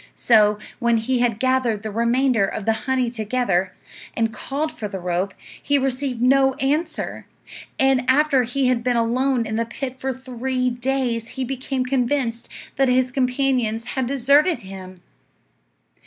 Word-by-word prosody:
So, 210 -3 +4 0.2
when 235 -1 +2
he 245 +3 0
had 235 -3 +1
gathered 255 -4 +1
the 215 - -4
remainder 235 +1 +2
of 195 +1 -3
the 225 - +3 0.2
honey 255 -3 +1
together, 215 -5 0 0.4
and 225 -1 0
called 290 +6 -3
for 215 - -6
the 195 -2 -6
rope, 180 +2 -2 0.3
he 285 - +2
received 260 -2 -2
no 270 +1 +4
answer; 310 +4 -2 0.5
and 265 -1 +3
after 285 0 +4
he 250 +3 -1
had 250 -2 +1
been 245 -1 +1
alone 245 +2 +1
in 220 0 -3
the 230 - +1
pit 260 +2 -6
for 265 0 -2
three 255 0 -2
days 245 -2 -1
he 265 - -1
became 260 0 -3
convinced 250 -2 -1 0.3
that 270 -1 +3
his 255 0 +2
companions 250 -3 0
had 265 -3 -1
deserted 280 +3 +3
him. 185 -2 -10
250 Hz, 155 wpm, -22 LUFS, 230-265 Hz, 0.5 s, So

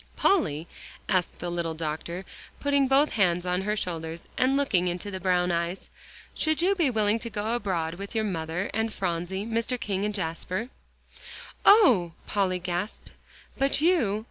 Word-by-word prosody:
"Polly," 165 - +2 0.4
asked 185 -3 0
the 175 0 -4
little 170 -2 -2
doctor, 165 +3 -4 0.3
putting 280 -1 +2
both 275 +3 +4
hands 180 -4 +2
on 180 +1 0
her 210 +2 -1
shoulders, 165 -3 -4
and 265 +2 +3
looking 195 -11 +2
into 180 +3 -3
the 190 - -4
brown 180 -1 +2
eyes, 170 +2 -2 0.4
"should 315 -1 0
you 365 +4 +3
be 340 -8 +2
willing 215 -1 +2
to 235 - -4
go 215 +1 -2
abroad 180 -8 -1
with 200 +3 -7
your 220 - +2
mother 175 -2 -2
and 220 +1 0
Phronsie, 185 +1 -2
Mr. 230 +2 -1
King 200 -5 -2
and 210 0 -1
Jasper?" 185 +5 -3 1.0
"Oh!" 245 - +6
Polly 190 -3 0
gasped. 180 +3 -4 0.5
"But 275 +1 +2
you?" 290 - +3
195 Hz, 160 wpm, -27 LUFS, 175-230 Hz, 1.0 s, Oh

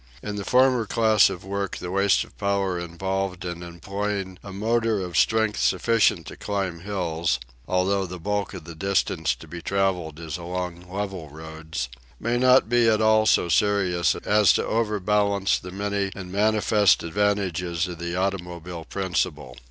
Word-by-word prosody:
In 105 -1 -4
the 100 - -4
former 125 -1 +3
class 110 -2 +4
of 95 -1 -7
work 100 0 -3
the 90 - -6
waste 100 0 +3
of - - -17
power 100 -3 0
involved 95 +2 -3
in 85 -1 -5
employing 95 +2 -4
a 100 - -8
motor 110 +2 0
of 90 -3 -5
strength 110 -2 +2
sufficient 115 +4 +2
to - - -8
climb 95 -5 -3
hills 85 -5 -1 0.3
although 95 +1 +1
the 90 +1 -7
bulk 100 +3 -2
of 90 - -8
the 85 +1 -9
distance 85 -2 0
to - - -13
be 85 0 -8
travelled 90 -5 -1
is 80 -1 -5
along 90 0 -5
level 95 -5 -4
roads 80 -3 -6 0.3
may 120 +2 0
not 130 -2 +5
be 120 0 +4
at 110 -1 +3
all 110 0 +4
so 90 - +4
serious 90 -1 +2
as 105 -1 +5
to - - 0
overbalance 105 -2 +1
the 90 - -9
many 100 +1 -2
and 90 -2 -8
manifest 105 0 +3
advantages 90 -2 0
of 90 -2 -7
the 85 0 -3
automobile 90 -3 -3
principle. 85 -9 -2
95 Hz, 160 wpm, -24 LUFS, 85-105 Hz, 0.3 s, not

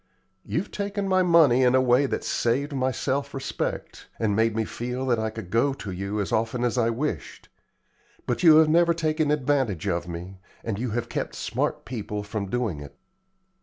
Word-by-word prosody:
You've 170 +6 -3
taken 200 -1 -3
my 185 -1 +3
money 165 -8 +5
in 125 0 +4
a - - +5
way 130 +2 +3
that - - -3
saved 140 +5 0
my 130 -1 +1
self 140 +2 -2
respect, 135 - -4
and 105 -3 0
made 110 0 +2
me 110 0 0
feel 125 +4 -4
that 120 -3 +1
I 110 0 -1
could 110 -5 -9
go 120 +5 +2
to 105 -7 -7
you 100 +3 -3
as 100 - -2
often 115 +2 0
as 120 -1 +1
I 115 -2 +2
wished; 135 +7 -4 0.8
but 120 - -1
you 160 -3 +8
have 160 0 +7
never 170 +1 +4
taken 155 -2 0
advantage 130 - 0
of 85 -2 -1
me, 90 +2 -7 0.2
and 110 -3 -3
you 125 +1 -2
have 120 +2 -2
kept - - -4
smart - - -2
people 105 -4 -4
from 105 -1 -4
doing 110 -9 -1
it. 70 -1 -11
125 Hz, 195 wpm, -25 LUFS, 110-145 Hz, 0.8 s, you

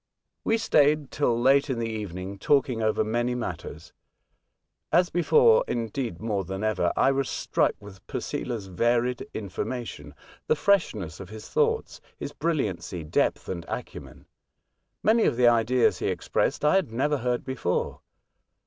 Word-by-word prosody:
We 225 - +2
stayed 150 -9 +3
till 120 -6 +1
late 135 +4 +4
in 130 - -1
the 115 - -1
evening 100 -3 -5
talking 130 -3 +2
over 110 0 +2
many 120 +3 -1
matters. 90 -9 -6 1.0
As 175 +1 +3
before, 460 - +5
— - - -37
indeed, 115 -4 -3
more 105 -3 -1
than 95 +3 -5
ever, 110 -5 +1
— - - -22
I 135 - +4
was 135 -1 -1
struck - - +1
with 95 -2 -14
Posela's 115 -5 -4
varied 120 +6 0
information, 110 +4 -5 0.3
the - - +3
freshness 110 - +1
of 95 -2 -9
his 110 0 -10
thoughts, 455 0 0 0.2
his - - -6
brilliancy, 105 - -2
depth, 75 - 0
and 85 -2 -4
acumen. - - -7 0.8
Many 220 +2 +4
of - - +1
the 125 -1 +5
ideas 120 +1 +3
he - - -1
expressed - - -1
I 150 - +5
had 190 -12 -1
never 145 +6 +1
heard 125 0 -1
before. 130 -9 -2
120 Hz, 150 wpm, -26 LUFS, 105-140 Hz, 1.0 s, before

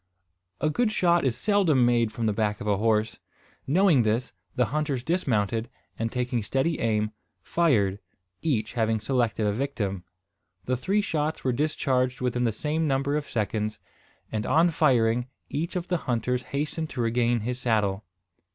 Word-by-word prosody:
A 155 - +1
good 230 +6 +1
shot 175 -4 +3
is 120 -3 0
seldom 170 - +3
made 120 -2 +2
from 115 - -3
the 105 - +2
back 105 -1 0
of - - -6
a 105 -2 +2
horse. 110 +1 +1 0.5
Knowing 165 -2 +4
this, 115 +3 0 0.2
the 125 - +3
hunters 150 -5 -1
dismounted; 115 - 0 0.3
and, 115 0 -1
taking 125 -1 -1
steady 135 +9 0
aim, 110 -1 0 0.3
fired, 105 - +2 0.4
each 120 -9 -1
having 110 -2 +1
selected 115 -2 0
a 105 - +1
victim. 105 -7 -2 0.6
The 130 - +1
three 195 +12 +1
shots 155 -5 -2
were 130 - +2
discharged 130 -2 0
within 125 -1 0
the 115 - +2
same 155 +8 -1
number 140 +1 +1
of 150 -1 -3
seconds; 105 -1 -2 0.5
and, 110 -1 -2
on 165 +3 +4
firing, 125 -6 +2 0.2
each 165 +6 -3
of 180 -1 -2
the 180 - +1
hunters 125 -2 -1
hastened 155 +3 -2
to 125 - -3
regain 120 0 +1
his 125 +3 -3
saddle. 105 -5 0
125 Hz, 160 wpm, -26 LUFS, 110-150 Hz, 0.6 s, Knowing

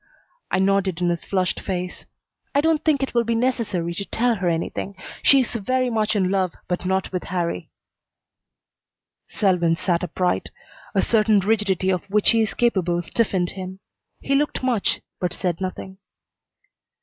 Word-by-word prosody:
I - - +1
nodded 190 -2 +2
in 175 -1 +1
his 170 -1 -1
flushed 185 -2 0
face. 180 -1 -4 0.5
"I 285 - +5
don't 320 0 +2
think 290 -4 +2
it 270 - -3
will 235 -1 +3
be 230 0 0
necessary 225 -8 0
to 200 - -4
tell 240 +6 +1
her 180 -2 0
anything. 170 +4 -3 0.3
She's 265 -4 +4
very 255 +3 0
much 215 -1 +1
in 190 -2 +2
love, 190 -3 0
but 180 0 -2
not 190 0 0
with 180 -1 -3
Harrie." 175 -2 -2 1.6
Selwyn 180 -5 +2
sat 175 -1 0
upright. 180 +1 -1 0.5
A - - +3
certain 215 -2 +4
rigidity 195 -2 +1
of 180 -2 -1
which 210 +1 +4
he 230 -1 +3
is 215 - -1
capable 180 -7 +1
stiffened 185 -2 0
him. 190 0 -7 0.4
He 275 - -1
looked 290 -1 +1
much, 245 -6 +1 0.2
but 180 -1 -1
said 180 -2 -2
nothing. 190 0 -5
190 Hz, 160 wpm, -23 LUFS, 180-230 Hz, 1.6 s, I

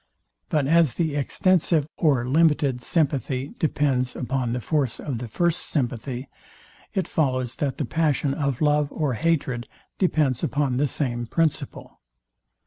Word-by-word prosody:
But 150 -3 +1
as 160 -2 +4
the 160 -4 0
extensive 165 +1 +2
or 135 -7 +2
limited 145 -3 +2
sympathy 140 -2 -1
depends 135 -5 +1
upon 130 -1 -2
the 125 - -1
force 135 -1 0
of 130 -6 -4
the 125 - -5
first 170 +8 +1
sympathy; 125 -1 -3 0.7
it 190 - 0
follows, 130 -5 0
that 140 -3 -1
the 145 - -1
passion 150 -1 +1
of 140 -3 -2
love 150 -1 +2
or 150 -5 -1
hatred 135 -4 0 0.3
depends 150 - +2
upon 135 -1 0
the 145 +2 +2
same 120 -4 -2
principle. 165 +3 -2
140 Hz, 135 wpm, -24 LUFS, 125-155 Hz, 0.7 s, as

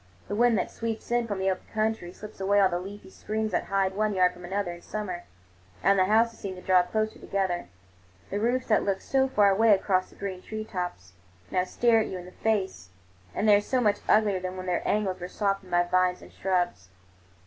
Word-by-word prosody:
The - - -4
wind 235 0 +4
that 185 - -1
sweeps 225 0 -5
in 240 -1 +1
from 205 -3 -3
the 190 0 +1
open 185 - -6
country 215 -5 -1
strips 210 +3 -11
away 200 +1 +3
all 195 -1 +5
the 175 -1 -1
leafy 195 +1 -9
screens 215 +2 -3
that - - 0
hide 195 -1 +1
one 210 0 0
yard 180 -1 +4
from 180 0 -13
another 190 0 -2
in 175 0 -10
summer, 185 -4 -5 0.6
and 195 0 +4
the 185 - +5
houses 225 +3 +2
seem 190 -2 -5
to 180 - -10
draw 185 -1 +5
closer 215 +4 -2
together. 190 - -2 0.6
The 200 - -1
roofs, 245 +4 +1
that 215 - +3
looked 195 -1 -1
so 265 0 +2
far 205 -6 +4
away 215 +2 +5
across 185 -1 0
the - - -19
green 190 -2 -5
tree 215 +2 -6
tops, 180 - -5 0.4
now 180 0 +1
stare 230 +4 +3
you 190 - -3
in 180 - -9
the 180 - -11
face, 190 - -1 0.5
and 215 - 0
they 210 - +8
are 205 - +3
so 255 +5 0
much 210 -4 +2
uglier 210 -3 +4
than 185 0 -5
when 185 - -5
their 180 -1 0
angles 195 -3 0
were 180 - -5
softened 195 -1 -2
by 175 0 +3
vines 180 0 +1
and - - -15
shrubs. 175 - -1
195 Hz, 225 wpm, -27 LUFS, 185-215 Hz, 0.6 s, they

